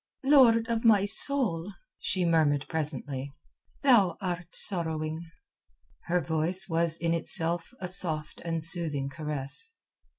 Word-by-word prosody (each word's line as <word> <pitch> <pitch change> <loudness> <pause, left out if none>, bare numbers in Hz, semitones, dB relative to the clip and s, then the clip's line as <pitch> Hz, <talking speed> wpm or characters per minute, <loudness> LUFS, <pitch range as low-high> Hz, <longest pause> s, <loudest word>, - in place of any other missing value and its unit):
"Lord 250 -5 +3
of 230 -1 -3
my 210 -4 +3
soul," 205 -5 0 0.3
she 185 -2 -2
murmured 155 -4 0
presently, 140 -3 -4 0.5
"thou 210 - +3
art 180 -3 -5
sorrowing." 160 -3 +1 0.8
Her 175 +1 -1
voice 160 +5 0
was 165 -1 +1
in 170 0 -2
itself 170 0 -2
a 180 - -6
soft 160 -4 +2
and 165 -1 -3
soothing 155 -5 +3
caress. 150 - -4
170 Hz, 120 wpm, -26 LUFS, 155-190 Hz, 0.8 s, Lord